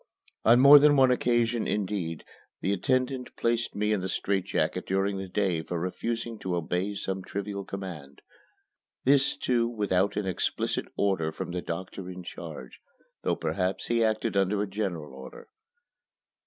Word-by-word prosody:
On 115 +2 +6
more 140 +2 +10
than 145 0 +5
one 130 -1 +6
occasion, 120 -2 +1
indeed, 95 -5 -2 0.3
the 100 - 0
attendant 130 +5 -1
placed 120 0 0
me 105 +1 +1
in 100 - 0
the 95 - -3
strait 95 -1 0
jacket - - -1
during 95 +1 0
the 95 - -5
day 90 -3 0
for 85 +1 -4
refusing 115 +5 -3
to 90 -1 -2
obey 90 +4 -1
some 95 -1 -3
trivial 100 0 -4
command. 85 -9 -8 0.8
This, 135 +1 +3
too, 120 -2 +1
without 100 -4 0
an 105 - -1
explicit 95 -2 -1
order 95 -6 +1
from 85 - -5
the 90 0 -3
doctor 90 +2 -6
in 90 0 -8
charge, 65 -6 -9 0.4
though - - +1
perhaps 95 0 -2
he 115 -1 +3
acted 110 -2 0
under 100 +1 +2
a - - -3
general 95 -8 -4
order. 65 -1 -11
100 Hz, 155 wpm, -28 LUFS, 90-115 Hz, 0.8 s, more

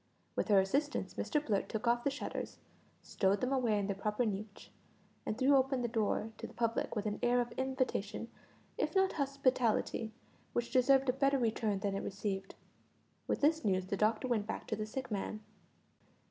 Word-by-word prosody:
With - - 0
her 205 -3 +6
assistance 280 +11 0
Mr 300 -1 -1
Blurt 200 -4 0
took 220 +2 -3
off 240 0 +3
the - - +2
shutters, 280 +1 -5 0.5
stowed 195 +1 +1
them 255 +1 0
away 240 -5 +2
in 200 - 0
their 200 0 -1
proper 210 +4 0
niche, 205 0 -5 0.6
and 215 - -1
threw 270 +2 +5
open 265 -1 +2
the - - +1
door 220 -1 0
to - - -5
the - - -15
public 230 0 0
with 210 -1 -2
an 210 -1 -2
air 245 +1 +3
of 240 -1 -1
invitation, 255 -5 -2 0.5
if - - 0
not 385 0 +4
hospitality, 255 -5 +1 0.4
which 240 0 -1
deserved 265 +1 +4
a - - +4
better 275 +1 +3
return 220 -4 0
than 200 -1 0
it 195 - -2
received. 195 -1 -3 0.7
With - - 0
this 315 +2 +3
news 185 -3 +1
the 195 - -2
doctor 215 +5 +1
went 220 -4 0
back - - -4
to 220 - 0
the 215 0 -4
sick 260 +2 -5
man. 215 +1 -3
230 Hz, 190 wpm, -34 LUFS, 210-265 Hz, 0.7 s, her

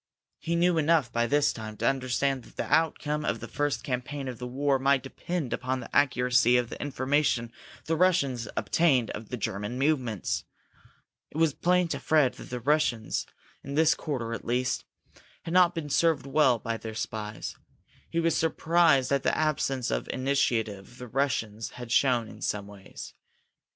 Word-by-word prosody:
He 170 - -2
knew 170 0 +3
enough, 155 -5 +2
by 120 0 +1
this 145 +2 +2
time, 110 -1 -7
to 115 - 0
understand 135 0 0
that - - -18
the - - -2
outcome 150 -1 +1
of - - -1
the - - -7
first 145 -1 -1
campaign 135 +2 -3
of 125 -3 -6
the 125 - -5
war 135 +2 +1
might 135 0 +2
depend 150 +1 -4
upon 130 +1 -2
the - - -9
accuracy 125 -2 +4
of 120 -1 -1
the - - -7
information 135 -3 0 0.3
the 165 - 0
Russians 140 - +2
obtained 135 -9 +2
of 105 0 -8
the 125 - -4
German 105 +2 -3
movements. 130 - 0 0.9
It - - -9
was 160 -3 +3
plain 180 +2 +2
to - - -2
Fred 150 -5 +3
that - - -11
the 125 - -4
Russians, 125 -4 0 0.4
in 140 +1 -6
this 160 +1 +5
quarter 120 -7 -4
at - - -5
least, 125 +1 -1 0.6
had 165 - -5
not 180 -1 +5
been 165 - -2
well 145 - -8
served 145 -5 +2
by 115 0 -2
their 110 -1 -7
spies. 110 -1 -5 0.5
He 165 - -1
was 165 -1 +2
surprised 160 -4 +3
at 140 -1 +2
the - - +1
absence 135 -5 0
of - - -2
initiative 120 -5 -1
the 125 - -8
Russians 115 -4 -2
had 120 -1 -8
shown 120 -3 +3
in - - -12
some 105 -1 -2
ways. 100 -1 -11
135 Hz, 175 wpm, -28 LUFS, 120-150 Hz, 0.9 s, this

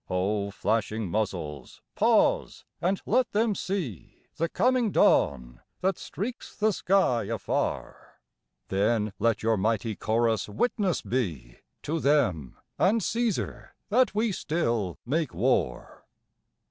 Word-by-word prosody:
O 100 +2 0
flashing 105 -1 -1
muzzles, 85 - -3
pause, - - +2 0.2
and 185 +2 +1
let 255 - +1
them 215 +1 +2
see 175 - -5
The 165 +1 0
coming 250 +1 +2
dawn 60 - +2 0.2
that 190 +1 0
streaks 235 +5 -6
the 215 0 +2
sky 175 - +2
afar; 110 -1 -3 0.5
Then 105 +1 +1
let 115 -2 +1
your 110 0 +2
mighty 110 +2 0
chorus 110 -1 0
witness 195 - 0
be 80 - -3 0.3
To 160 +2 -1
them, 95 - +1 0.2
and 210 +3 +3
Caesar, 230 -2 -2
that 245 +1 +3
we 220 +1 +1
still 115 - -1
make 150 +1 -1
war. - - -1
115 Hz, 115 wpm, -27 LUFS, -, 0.5 s, and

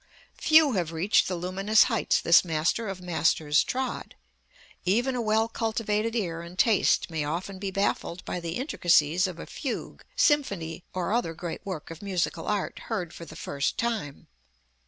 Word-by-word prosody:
Few 315 -2 +6
have 175 -7 -1
reached 170 +6 +2
the 185 - -2
luminous 195 +5 +3
heights 225 -4 +1
this 170 - +6
master 165 +7 0
of 195 -1 -5
masters 160 -3 +2
trod. 260 0 -4 0.7
Even 240 +8 +1
a 245 - -1
well 220 0 +2
cultivated 225 -1 -1
ear 170 -7 -2
and 170 +2 -11
taste 210 -5 +3
may 160 -2 -1
often 175 +6 -4
be 195 0 -3
baffled 190 -2 -2
by 180 - -3
the 170 -1 -4
intricacies 175 - +2
of 180 -3 -7
a - - -7
fugue, 265 - -5
symphony 185 - +1
or 185 +2 -2
other 230 -9 0
great 170 0 -6
work 185 -6 -6
of 165 - -9
musical 190 -3 -2
art 210 -2 -2
heard 180 -7 -3
for 170 - -9
the - - -12
first 140 0 -2
time. 220 - -3
185 Hz, 165 wpm, -27 LUFS, 170-220 Hz, 0.7 s, Few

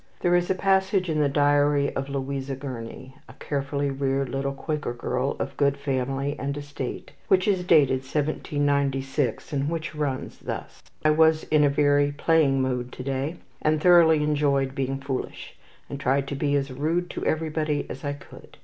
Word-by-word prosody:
There 175 0 +3
is 175 0 +1
a 190 - +2
passage 190 -1 +2
in 155 - 0
the 145 -1 +3
diary 145 0 +2
of 135 +1 -3
Louisa 135 0 -3
Gurney, 130 -1 -7 0.2
a - - -11
carefully 140 0 -2
reared 135 -1 -1
little 135 +1 -2
Quaker 150 -4 -3
girl 125 +3 -2
of 135 - -4
good 140 -1 +2
family 135 0 -2
and 140 +2 -3
estate, 145 -3 -6 0.2
which 185 +1 +3
is 190 -3 +2
dated 145 -7 +4
1796, 140 -1 -1
and 140 +1 0
which 165 0 -4
runs 145 -4 -3
thus: - - -6 0.2
"I 155 - +6
was 160 0 +4
in 155 -1 +5
a 145 - +5
very 145 0 +3
playing 145 -3 +2
mood 125 -1 -2
to 130 - -7
day, 135 +4 -2 0.3
and 155 0 +2
thoroughly 160 -2 +6
enjoyed 140 -3 +1
being 135 -1 -2
foolish, 135 -1 -5 0.3
and 140 - -6
tried 140 +1 +1
to 140 - -3
be 145 +1 0
as 140 -1 -1
rude 160 +7 -1
to - - -5
everybody 155 -1 -1
as - - -8
I 145 -1 -2
could. 145 - -14
145 Hz, 175 wpm, -25 LUFS, 135-155 Hz, 0.3 s, I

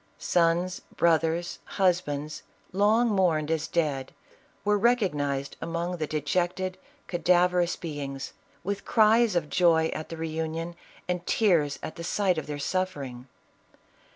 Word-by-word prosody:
Sons, 175 +1 +1
brothers, 170 +1 +1
husbands, 155 -6 0 0.3
long 210 +5 +3
mourned 170 -7 +2
as 160 -1 0
dead, 145 -5 -1 0.5
were 210 0 +4
recognized 150 - +1
among 170 +2 -2
the 155 -2 -2
dejected, 180 +5 -1 0.3
cadaverous 180 0 +2
be 150 -4 -6
ings, 135 -1 -5 0.3
with 200 +2 -3
cries 220 -1 +4
of 170 -3 +1
joy 165 -1 +3
at 155 - -6
the 165 - -6
reunion, 160 +1 -3 0.3
and 180 -1 -2
tears 170 -10 +2
at - - -6
the 170 - -6
sight 185 -1 +1
of 155 - -8
their 150 -1 -4
suffering. 140 -7 -3
170 Hz, 125 wpm, -27 LUFS, 155-185 Hz, 0.5 s, were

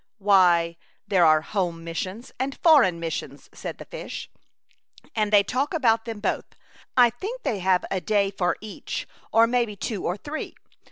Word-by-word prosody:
*' - - -60
" - - -63
Why, 170 -3 +5 0.3
there 185 -4 +4
are 155 0 +5
home 175 -2 -2
missions 185 +8 -5
and 265 +1 -2
foreign 265 - +6
missions/' 165 -1 -5
said - - -6
the - - -10
fish. - - -7 0.8
"And 215 -2 +1
they 205 -1 +6
talk 270 - -1
about 230 -7 +2
them 225 -3 -5
both. - - -3 0.4
I 245 -2 +7
think 425 - -6
they 210 - -1
have 185 0 +2
a 190 - -1
day 200 -1 +1
for 180 -2 0
each, 215 -1 -6 0.2
or 225 0 +6
maybe 235 -3 0
two 200 0 -4
or 180 - -1
three. 295 +8 -6
205 Hz, 175 wpm, -25 LUFS, 180-240 Hz, 0.8 s, I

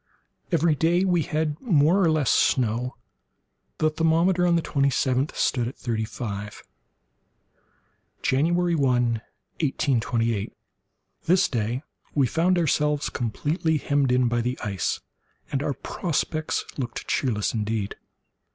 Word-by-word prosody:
Every 165 -1 +3
day 170 +5 +2
we 180 -3 +2
had 155 -1 -2
more 175 - +3
or 170 - +4
less 155 -4 +2
snow. 120 0 +1 0.8
The 155 0 +2
thermometer, 170 +3 +2
on 170 - +3
the 165 - +1
twenty 140 -1 +1
seventh 130 +1 0
stood 120 -3 +1
at 125 - -7
thirty 110 -2 -2
five. 105 -1 -6 1.6
January 170 +6 +2
1, 125 -6 +2 0.4
1828.—This 125 - -1
day 120 +2 -2 0.3
we 140 -3 +4
found 175 +8 +2
ourselves 150 -2 +1
completely 150 - -1
hemmed 140 -2 +1
in 125 0 +3
by 120 0 +1
the 125 +2 -2
ice, 100 -5 -2 0.5
and 135 - 0
our 140 -1 -1
prospects 155 -2 -2
looked 120 -2 -4
cheerless 110 -7 0
indeed. 105 -2 -2
140 Hz, 120 wpm, -25 LUFS, 120-160 Hz, 1.6 s, or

